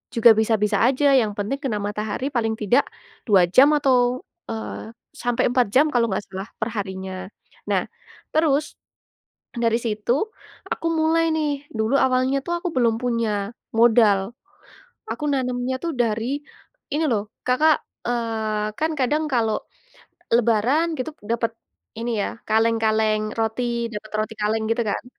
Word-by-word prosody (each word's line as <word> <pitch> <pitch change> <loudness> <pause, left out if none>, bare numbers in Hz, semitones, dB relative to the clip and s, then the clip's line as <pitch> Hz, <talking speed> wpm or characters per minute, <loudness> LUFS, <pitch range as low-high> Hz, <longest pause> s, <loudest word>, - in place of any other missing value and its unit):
juga 230 0 +7
bisa-bisa 215 -1 +2
aja 275 +2 +3
yang 225 -5 +3
penting 210 +7 -2
kena 240 -6 -1
matahari 210 +5 -3
paling 225 -3 0
tidak, 240 +6 +3 0.4
2 195 -5 +6
jam 265 +10 +7
atau, 255 -3 +2 0.2
eee, 220 0 -5 0.3
sampai 245 -4 0
4 250 -3 +3
jam 290 +4 +6
kalau 240 -2 +3
nggak 190 +1 -2
salah 190 +2 -6
per 220 - -1
harinya. 190 -2 -5 0.4
Nah, - - +2 0.5
terus, 300 -1 +2 0.9
dari 230 -1 +2
situ 215 0 -1 0.6
aku - - -3
mulai 325 +1 +2
nih 290 -2 -2
dulu 220 +3 0
awalnya 260 +1 +2
tuh 345 - -1
aku 360 - -1
belum 230 -3 +3
punya 225 -4 -1 0.2
modal. 225 -3 +5 0.9
Aku - - -5
nanamnya 250 -1 -1
tuh 335 - -1
dari, 225 -2 0 0.7
ini 305 +2 +1
loh 210 -1 -1 0.2
Kakak, 300 +5 +4 0.3
eee, 220 -3 -2
kan 315 +1 +1
kadang 295 +5 +1
kalau, 225 -4 +1 0.8
lebaran 245 +8 +2
gitu 255 +4 -3
dapet, 230 +1 0 0.5
ini 235 +1 -2
ya - - -2 0.2
kaleng-kaleng 220 -1 +1
roti 225 +2 0 0.3
dapet 210 0 -7
roti 215 +1 -1
kaleng 220 +1 0
gitu 230 +1 +1
kan. - - -3
230 Hz, 140 wpm, -23 LUFS, 215-260 Hz, 0.9 s, juga